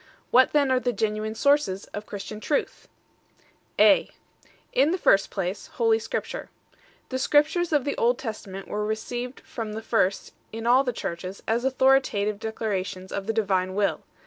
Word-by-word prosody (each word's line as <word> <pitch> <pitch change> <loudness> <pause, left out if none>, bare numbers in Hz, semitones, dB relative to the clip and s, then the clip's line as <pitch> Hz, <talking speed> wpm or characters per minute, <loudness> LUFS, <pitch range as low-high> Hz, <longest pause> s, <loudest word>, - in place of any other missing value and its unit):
What 255 +1 +6
then 285 -3 +3
are 255 - +3
the 245 -1 -1
.genuine 215 0 -2
sources 280 -7 +2
of 210 +1 -6
Christian 205 +1 -7
truth? 285 +6 -2 0.9
A. - - +5 0.7
_In 280 +4 +4
the 365 - 0
first 195 - +3
place, 190 0 -4
Holy 225 -2 +3
Scripture - - -4 0.2
1. - - -32 0.3
The 260 - -2
Scriptures 310 +5 +2
of 295 -4 +2
the 285 - -1
Old 240 +1 +2
Testament 200 -6 -7
were 210 0 -2
received 240 +4 -4
from 220 -3 -6
the 220 +1 -6
first 195 -5 0 0.2
in 225 +1 -6
all 250 +3 +5
the 250 - -1
Churches 185 -2 -6
as 230 +2 +1
authoritative 260 -6 +2
declarations 200 -4 -3
of 200 0 -4
the 225 - 0
Divine 190 -4 0
Will. 205 0 +1
220 Hz, 165 wpm, -25 LUFS, 200-255 Hz, 0.9 s, What